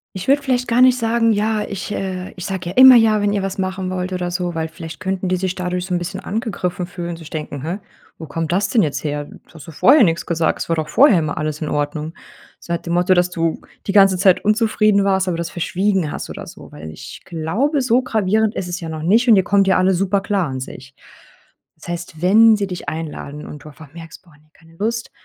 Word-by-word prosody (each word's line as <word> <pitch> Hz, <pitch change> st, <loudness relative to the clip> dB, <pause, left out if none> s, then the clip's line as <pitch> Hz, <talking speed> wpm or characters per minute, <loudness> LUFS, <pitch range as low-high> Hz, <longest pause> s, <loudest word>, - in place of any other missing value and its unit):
Ich 185 Hz, -, -6 dB
würde 280 Hz, +2 st, +4 dB
vielleicht 255 Hz, -3 st, -1 dB
gar 235 Hz, +1 st, +2 dB
nicht 255 Hz, 0 st, +6 dB
sagen: 230 Hz, -1 st, +2 dB
„Ja, 215 Hz, +1 st, 0 dB
ich, 200 Hz, +1 st, -6 dB
äh 185 Hz, -2 st, -4 dB
ich 180 Hz, -, -7 dB
sage 185 Hz, -3 st, -4 dB
ja -, -, -12 dB
immer 260 Hz, 0 st, +9 dB
ja, 220 Hz, -2 st, +4 dB
wenn 205 Hz, 0 st, +1 dB
ihr 200 Hz, -1 st, -1 dB
was 195 Hz, 0 st, -4 dB
machen 190 Hz, 0 st, -3 dB
wollt 185 Hz, 0 st, -3 dB
oder 180 Hz, -1 st, -3 dB
so“, 175 Hz, -1 st, -3 dB
weil 160 Hz, 0 st, -2 dB
vielleicht 165 Hz, 0 st, -10 dB
könnten 190 Hz, 0 st, -3 dB
die 185 Hz, -, +2 dB
sich 185 Hz, 0 st, -2 dB
dadurch 180 Hz, -1 st, -3 dB
so 185 Hz, -, -4 dB
'n 175 Hz, -, +1 dB
bisschen 175 Hz, -, -5 dB
angegriffen 190 Hz, -5 st, -3 dB
fühlen 175 Hz, -2 st, -6 dB
sich 165 Hz, -2 st, -12 dB
denken: 150 Hz, -3 st, -6 dB
„Hä, 170 Hz, +5 st, -3 dB, 0.4 s
wo 160 Hz, -, -8 dB
kommt 160 Hz, +2 st, -4 dB
das 195 Hz, +3 st, +1 dB
denn 230 Hz, -, +3 dB
jetzt 150 Hz, -6 st, -2 dB
her? 145 Hz, -1 st, -3 dB
Du -, -, -14 dB
hast 160 Hz, -2 st, -13 dB
doch 165 Hz, -, -10 dB
vorher 250 Hz, -, +5 dB
nix 170 Hz, -3 st, +1 dB
gesagt. 165 Hz, -2 st, -1 dB
Es -, -, -5 dB
war 165 Hz, -, +2 dB
doch 155 Hz, -1 st, -3 dB
vorher 250 Hz, -, +5 dB
immer 155 Hz, -2 st, -3 dB
alles 155 Hz, 0 st, -3 dB
in 155 Hz, -, -3 dB
Ordnung.“ 150 Hz, +2 st, -3 dB, 0.4 s
So 170 Hz, -, -5 dB
nach 170 Hz, -, -2 dB
dem 170 Hz, -, -4 dB
Motto, 180 Hz, +2 st, +3 dB
dass 180 Hz, 0 st, +2 dB
du 165 Hz, -2 st, -2 dB, 0.2 s
die -, -, -1 dB
ganze 195 Hz, -2 st, +5 dB
Zeit 185 Hz, 0 st, +3 dB
unzufrieden 215 Hz, -1 st, +2 dB
warst, 190 Hz, -1 st, +1 dB
aber 175 Hz, -2 st, -1 dB
das 170 Hz, 0 st, -4 dB
verschwiegen 185 Hz, -1 st, -1 dB
hast -, -, -6 dB
oder -, -, -8 dB
so, -, -, -13 dB
weil 80 Hz, +1 st, -9 dB
ich 80 Hz, -, -10 dB
glaube, 210 Hz, -, -1 dB
so 250 Hz, 0 st, +2 dB
gravierend 220 Hz, -3 st, 0 dB
ist 180 Hz, -, -3 dB
es 175 Hz, +1 st, -4 dB
ja 165 Hz, -, -6 dB
noch 155 Hz, -1 st, -6 dB
nicht 225 Hz, +9 st, +3 dB
und 220 Hz, -, +8 dB
ihr 190 Hz, -, +3 dB
kommt 195 Hz, +1 st, +2 dB
ja 190 Hz, -, +4 dB
alles 185 Hz, -1 st, +2 dB
super 195 Hz, 0 st, +1 dB
klar 195 Hz, -4 st, -1 dB
an 130 Hz, -1 st, -5 dB
sich. 130 Hz, +1 st, -10 dB, 0.8 s
Das -, -, -14 dB
heißt, 170 Hz, -2 st, -6 dB
wenn 215 Hz, +4 st, +6 dB
sie 200 Hz, -1 st, -2 dB
dich 180 Hz, -5 st, -5 dB
einladen 150 Hz, -1 st, -7 dB
und 145 Hz, -1 st, -10 dB
du -, -, -12 dB
einfach 150 Hz, 0 st, -15 dB
merkst: 165 Hz, +2 st, -12 dB
„Boah, 170 Hz, -, -22 dB
ne, 150 Hz, +1 st, -26 dB
keine 165 Hz, 0 st, -21 dB
Lust“, 230 Hz, +3 st, -3 dB
180 Hz, 250 wpm, -19 LUFS, 165-205 Hz, 0.8 s, immer